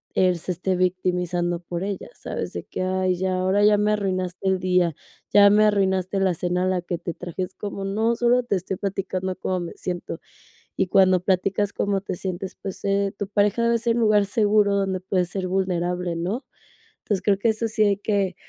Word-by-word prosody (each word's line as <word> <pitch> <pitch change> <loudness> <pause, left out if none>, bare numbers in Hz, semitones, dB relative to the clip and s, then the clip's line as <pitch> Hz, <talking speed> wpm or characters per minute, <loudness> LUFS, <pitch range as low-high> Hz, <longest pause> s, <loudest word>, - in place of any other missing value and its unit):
él 180 -2 +3
se 180 - -3
esté 185 +2 -1
victimizando 180 -1 0
por 175 0 -5
ella, 200 -1 -4
¿sabes?, - - -5
de - - -5
que: - - -5
"Ay, 185 -1 0
ya, 185 +1 -1
ahora 190 +2 +2
ya 210 0 +5
me 210 +1 +2
arruinaste 185 -2 -2
el 190 0 +3
día, 180 -3 +2 0.4
ya 200 0 +8
me 210 +1 +5
arruinaste 190 -2 +1
la 190 -2 +3
cena 180 +2 -1
a - - +1
la 185 -1 0
que 175 0 -3
te 170 -1 -4
traje", 180 +2 -5
es 180 - -7
como: 200 -1 -5
"No, 220 +4 +1
solo 240 +1 +3
te 220 -4 0
estoy 185 +1 -4
platicando 190 -1 -3
cómo 185 0 -2
me 170 - -6
siento", 175 -2 -5 0.6
y 190 - +1
cuando 185 -1 +5
platicas 195 +2 0
cómo 200 -1 0
te 195 - -4
sientes, 190 +1 -5
pues, 195 -2 -6
eh, 200 0 +1
tu 200 - -3
pareja 205 +2 +2
debe 235 0 +3
ser 230 0 +1
un 235 - +1
lugar 210 -2 +4
seguro 205 -1 +3
donde 190 -2 0
puedes 180 -1 -1
ser 190 -2 -3
vulnerable, 180 -2 -1
¿no? 195 - -3 0.6
Entonces 200 -3 -1
creo 200 -1 +3
que 225 - +2
eso 220 +1 0
sí 220 0 +1
hay 200 -2 +3
que 200 -3 0
190 Hz, 210 wpm, -24 LUFS, 180-205 Hz, 0.6 s, ya